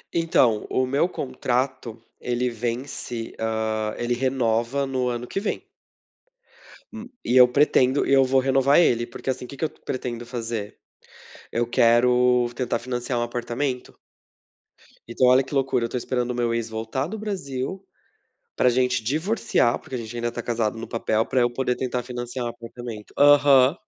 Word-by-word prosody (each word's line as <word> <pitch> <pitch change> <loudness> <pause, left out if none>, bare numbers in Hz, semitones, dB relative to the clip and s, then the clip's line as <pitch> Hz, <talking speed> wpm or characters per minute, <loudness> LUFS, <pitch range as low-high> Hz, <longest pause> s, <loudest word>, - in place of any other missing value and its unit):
Então, 130 -10 +2
o 130 - +1
meu 140 +7 +1
contrato, 130 -4 -2 0.2
ele 125 0 -1
vence, 120 0 -4
hã, 110 -1 -1
ele 120 0 -1
renova 125 +1 0
no 130 -2 -1
ano 120 0 -3
que 195 - -3
vem. 205 - -3 1.3
Hum 225 +1 -8 0.2
e 120 - 0
eu 125 - +9
pretendo 135 0 +3
e - - +2
eu 135 -1 +6
vou 130 +1 +3
renovar 135 +2 +4
ele, 120 -8 +3
porque, 120 - -7
assim, 125 -1 -2
o - - -11
que 140 - -10
que 160 - -1
eu - - -2
pretendo 120 -2 -5
fazer, 115 -3 -5 0.7
eu 120 0 0
quero 125 0 +4
tentar 120 -1 -1
financiar 125 0 -3
o - - 0
apartamento. 120 +2 -3 1.2
Então, 120 +2 +2
olha 130 +1 +5
que - - -11
loucura, 135 -3 +1
eu - - -4
tô 125 - -3
esperando 125 0 -2
o - - -4
meu 120 -1 0
ex 115 -1 -2
voltar 115 +5 -3
do 215 +5 -6
Brasil 185 -4 -4 0.7
pra 125 - +4
gente 125 0 +1
divorciar 155 - +1
porque 130 - -7
a - - -3
gente 115 0 -7
ainda 120 0 -2
tá 120 - -5
casado 115 -2 -1
no 115 - -6
papel 110 -1 0
pra 130 - +1
eu 120 0 +2
poder 125 0 0
tentar 125 -1 -2
financiar 120 0 -5
o - - -2
apartamento. 115 -2 -9
Aham. 145 -1 +6
125 Hz, 170 wpm, -24 LUFS, 120-135 Hz, 1.3 s, eu